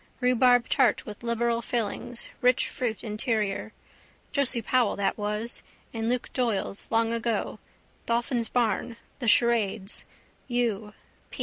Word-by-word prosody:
Rhubarb 250 -1 +4
tart 265 -3 +3
with 210 -1 -9
liberal 235 0 0
fillings, 240 +1 -3
rich 250 0 +3
fruit 230 -4 -3
interior. 215 -2 -1 0.6
Josie 260 -5 +1
Powell 245 -1 +2
that 195 -1 0
was. 210 +2 -3 0.3
In 225 0 -1
Luke 250 0 -1
Doyle's 225 -5 0
long 225 0 +2
ago. 230 -2 -1 0.5
Dolphin's 235 0 0
Barn, 230 -1 0 0.2
the 245 - -3
charades. 220 -4 +2 0.4
U. 225 -4 -1
235 Hz, 115 wpm, -27 LUFS, 215-245 Hz, 0.6 s, Rhubarb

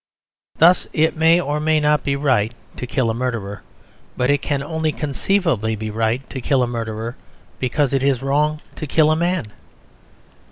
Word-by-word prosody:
Thus 175 +2 +5
it 160 +1 +2
may 165 +2 +4
or 150 -3 -1
may 155 0 +2
not 150 0 +2
be 140 - 0
right 125 -6 +1 0.2
to 125 - -5
kill 120 -3 0
a - - -2
murderer; 115 -5 -3 0.6
but 125 +2 +2
it 145 -1 +1
can 140 -2 -1
only 160 +1 -1
conceivably 150 - 0
be 110 0 -5
right 115 +4 -1
to 130 - -5
kill 130 0 +2
a - - 0
murderer 115 0 -4 0.4
because 135 +2 0
it 135 - +2
is 135 -2 +1
wrong 150 +2 +1 0.2
to 155 - -5
kill 155 +2 +3
a - - +3
man. 170 - -1
140 Hz, 175 wpm, -20 LUFS, 120-155 Hz, 0.6 s, Thus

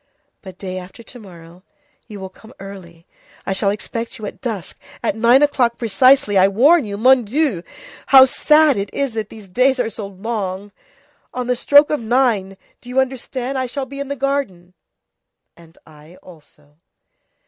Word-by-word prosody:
But 190 -2 -12
day 185 -1 -6
after 185 +6 -13
to 245 - -14
morrow 175 -4 -15 0.5
you 210 -3 -10
will 190 0 -7
come 220 +5 -18
early. 180 -4 -12 0.4
I 195 - -1
shall 195 +1 0
expect 230 +3 -5
you 215 - -8
at - - -9
dusk, 220 -9 -6 0.2
at - - -1
nine 235 +5 +4
o'clock 250 -5 +1
precisely, 230 -1 +3
I 190 - +5
warn 275 - +4
you. 200 -1 -6
Mon 255 +3 +4
Dieu! 245 - -1 0.5
how 265 -1 +8
sad 300 0 +3
it 200 0 -4
is 275 -4 -2
that 220 -2 -4
the 215 -3 -13
days 255 +7 +1
are 230 -2 -1
so 210 -1 -7
long! 200 -1 -5 0.6
On 250 0 -3
the 250 0 0
stroke 285 +4 +4
of 300 - 0
nine, 225 -5 0 0.2
do 245 - -13
you 255 +1 0
understand, 265 0 -3
I 260 - -2
shall 265 +2 -5
be 275 +1 -10
in 280 - -4
the 280 - -4
garden." 260 -11 -3 0.8
"And 165 0 -20
I 155 +2 -17
also." 150 -3 -19
220 Hz, 175 wpm, -19 LUFS, 190-260 Hz, 0.8 s, how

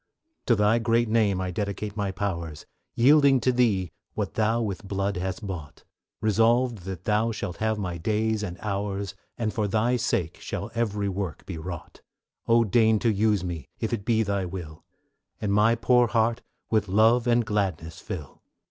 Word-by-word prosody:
To 120 - +5
Thy 105 +2 +3
great 115 +1 +2
name 105 -4 +2
I 90 -1 -2
dedicate 100 +2 -3
my 100 -2 -1
powers, 85 -6 -4 0.3
Yielding 140 +1 +5
to 130 - +3
Thee 105 -9 +1 0.2
what - - -2
Thou 110 +1 +1
with 100 -3 -3
blood 100 0 -1
hast 95 +3 -3
bought, 85 -7 -7 0.4
Resolved 115 +2 +3
that 95 -3 -6
Thou 110 +3 +1
shalt 100 -5 -5
have 110 0 0
my 90 -4 -4
days 110 +4 0
and 90 -4 -5
hours, 100 -2 -3 0.2
And 110 -3 -1
for 105 -2 0
Thy 110 +5 +1
sake 85 -7 -1
shall 100 +2 -5
every 105 -3 -1
work 95 -3 -4
be 85 -4 -6
wrought; 85 0 -8 0.5
O 115 0 +5
deign 110 +1 +3
to 115 +1 +1
use 105 -2 +2
me, 85 -5 -5
if 110 +1 -2
it 105 -4 -2
be 110 0 +2
Thy 100 -2 -1
will, 85 -4 -7 0.6
And 100 -2 -1
my 105 +3 +4
poor 120 +1 +4
heart 115 0 +1 0.3
with 110 -2 +2
love 110 +5 +4
and 120 -1 +3
gladness 90 -6 -2
fill. 75 -7 -7
105 Hz, 175 wpm, -26 LUFS, 95-115 Hz, 0.6 s, To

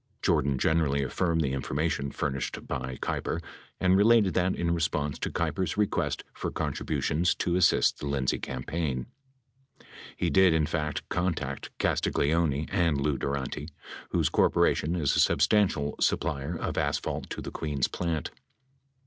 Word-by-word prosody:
Jordan 70 0 +2
generally 75 -2 +2
affirmed 80 +4 0
the 65 -4 0
information 70 +1 -1
furnished 70 -1 -3
by 65 -2 -4
Kei - - -1
per - - -2 0.4
and 95 0 +4
related 105 -1 +5
that 90 +1 +1
in 85 0 0
response 75 -3 -1
to - - -2
Keiper's 95 -1 -1
request 105 -1 0
for - - -4
contributions 85 +4 0
to 85 - 0
assist 90 -2 +3
the 75 - -4
Lindsay 70 -2 0
campaign, 65 0 -3 1.1
he - - 0
did, 95 -3 +5
in 80 -1 +2
fact, 75 -1 -3
contact 85 -7 -2
Castagleoni 75 -1 +1
and 85 -6 +2
Lou 70 0 +1
Durante, 70 +2 -3 0.4
whose - - +1
corporation 80 +4 +2
is 75 -6 +1
a - - +2
substantial 85 -9 +3
supplier 80 +1 0
of - - -2
asphalt - - -2
to - - -5
the - - -6
Queens 75 -5 -1
Plant. 85 -3 -3
80 Hz, 140 wpm, -28 LUFS, 70-85 Hz, 1.1 s, related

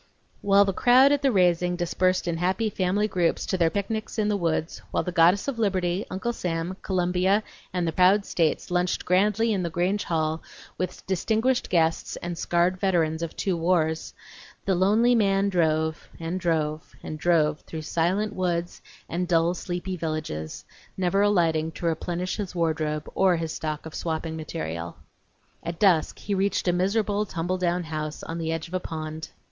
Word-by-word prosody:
While 200 0 +5
the 195 - -1
crowd 255 +7 +6
at 290 -1 +2
the 275 - +3
raising 180 -3 +2
dispersed 180 +1 0
in 170 -1 -1
happy 190 +5 0
family 195 +3 +1
groups 175 -5 0
to - - -1
their 170 -3 +3
picnics 215 +4 -3
in 210 -1 +1
the 210 - +1
woods; 165 -3 -1
while - - 0
the 180 - -3
Goddess 175 +5 +4
of 265 -4 -3
Liberty, 185 -3 0
Uncle 190 +6 -2
Sam, 170 -2 -3
Columbia, 185 +2 +1 0.3
and 180 -2 -1
the - - +1
proud 185 +4 +4
States 165 +1 0
lunched 180 0 0
grandly 210 +5 +2
in 195 - 0
the 170 - -2
Grange 180 +5 0
hall 160 -1 -1 0.3
with 185 0 -4
distinguished 225 +7 0
guests 165 -2 +1
and 175 0 -5
scarred 175 +2 +1
veterans 165 -5 +1
of 165 -1 -4
two 190 -3 0
wars, 165 -2 0 0.5
the 195 - +2
lonely 210 +7 +4
man 200 -3 +3
drove, 160 -3 0
and 165 +3 -3
drove, 155 -3 -1
and 155 - -6
drove 155 -3 +2
through 160 -1 -7
silent 185 +7 0
woods 175 -2 -2 0.3
and 180 +1 -2
dull, 170 0 +3
sleepy 180 +1 -4
villages, 155 - -4 0.3
never 190 +1 +2
alighting 165 -6 +2
to - - -6
replenish 175 +2 -2
his 195 -4 -5
wardrobe 155 -2 -1
or 190 -2 +3
his 165 -1 -3
stock 155 -1 -4
of 160 - -8
swapping 160 -1 -3
material. 85 - -5 0.7
At 170 0 -5
dusk 180 -6 +3
he 205 - -4
reached 195 0 0
a 175 - +3
miserable 205 +3 +1
tumble 180 +2 -2
down 175 0 0
house 155 -1 -5
on 165 +1 -5
the 160 -1 -2
edge 165 0 -3
of 170 - -15
a 185 - +1
pond. 155 -2 -6
175 Hz, 175 wpm, -26 LUFS, 165-195 Hz, 0.7 s, crowd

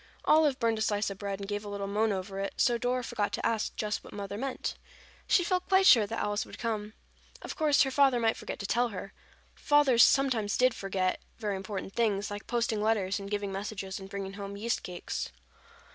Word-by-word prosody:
Olive 305 -4 +4
burned 225 -1 +1
a - - -3
slice 205 -1 0
of 195 - -8
bread 200 -1 -4
and 200 - -6
gave 205 0 -3
a 205 - -7
little 200 -1 -4
moan 210 +2 +1
over 195 0 -4
it, 195 - -3
so 240 -2 +3
Dora 250 +1 0
forgot 220 -4 -2
to - - -2
ask 225 -2 0
just 210 0 -2
what - - -12
Mother 200 -1 -5
meant. 265 +4 -3 0.5
She 355 - +4
felt 365 +1 0
quite 380 0 +5
sure 225 - +7
that 225 - -4
Alice 205 0 -1
would - - -11
come. 215 -2 -3 0.5
Of - - -6
course, 305 -1 +4
her 270 - -2
father 270 -2 +4
might 225 -1 +2
forget - - -6
to 200 - -6
tell 240 +4 +2
her. 195 -3 -7 0.4
Fathers 290 -5 +4
did - - +10
sometimes 245 -7 +1 0.2
forget 190 -3 -1 0.2
very 210 -3 -2
important 190 0 -5
things, 210 -3 0
like 205 0 -6
posting 230 -3 0
letters 210 -3 +1
and 200 0 -7
giving 205 -1 -2
messages 195 -1 -5
and 190 0 -10
bringing 195 -1 -5
home 200 0 -7
yeast 230 +3 -1
cakes. 180 -1 -5
210 Hz, 215 wpm, -30 LUFS, 200-240 Hz, 0.5 s, did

